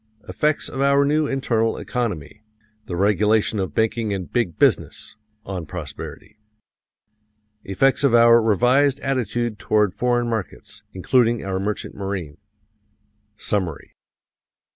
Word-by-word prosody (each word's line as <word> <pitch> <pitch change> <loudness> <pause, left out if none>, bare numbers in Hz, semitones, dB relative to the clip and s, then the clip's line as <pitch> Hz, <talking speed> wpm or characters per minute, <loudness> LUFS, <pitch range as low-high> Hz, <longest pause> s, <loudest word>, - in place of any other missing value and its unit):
Effects 150 0 0
of 135 - -5
our 140 0 +4
new 150 +1 +1
internal 115 -5 0
economy 105 - -4 0.5
the 90 - -4
regulation 105 +3 +2
of 95 - -3
banking 110 -1 0
and 95 -2 -7
"big 115 -9 -1
business" - - 0 0.3
on 90 -5 -5
prosperity. 90 +6 -9 1.2
Effects 135 +9 +1
of 135 -4 +4
our 115 0 +6
revised 125 +6 +2
attitude 120 -4 -2
toward 105 -2 +1
foreign 120 -1 0
markets, 110 -6 -5
including 115 +4 +1
our 95 -1 -2
merchant 105 +2 -4
marine. 95 -7 -5 1.0
Summary. 95 -9 -3
110 Hz, 115 wpm, -22 LUFS, 95-125 Hz, 1.2 s, our